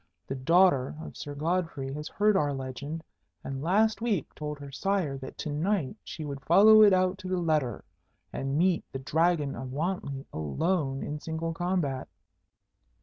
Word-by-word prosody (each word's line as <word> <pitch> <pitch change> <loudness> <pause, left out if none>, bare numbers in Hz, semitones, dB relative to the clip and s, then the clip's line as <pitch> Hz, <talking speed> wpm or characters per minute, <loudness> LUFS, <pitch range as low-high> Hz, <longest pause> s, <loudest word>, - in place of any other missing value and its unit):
The - - -4
daughter 140 -1 +3
of - - -9
Sir 145 -1 -7
Godfrey 155 -4 -1
has 150 +1 -5
heard 210 0 +2
our 145 -5 +1
legend, 140 +5 -5 0.4
and 135 0 -5
last 210 +7 +2
week 210 - -1
told 150 -1 -5
her 140 -1 -9
sire 180 -1 0
that 130 - -9
to 155 - -4
night 165 +1 0
she 155 - -7
would 140 -1 -5
follow 215 +7 +7
it 210 -1 +8
out 185 0 +2
to 185 - -7
the 185 0 0
letter, 155 - 0 0.5
and 135 +1 -2
meet 180 +1 +2
the - - -4
Dragon 150 +1 +1
of 130 +1 -6
Wantley 140 -3 -3
alone 135 - -1
in 150 +1 -4
single 165 +1 -3
combat." 165 -7 -1
155 Hz, 165 wpm, -28 LUFS, 135-185 Hz, 0.5 s, it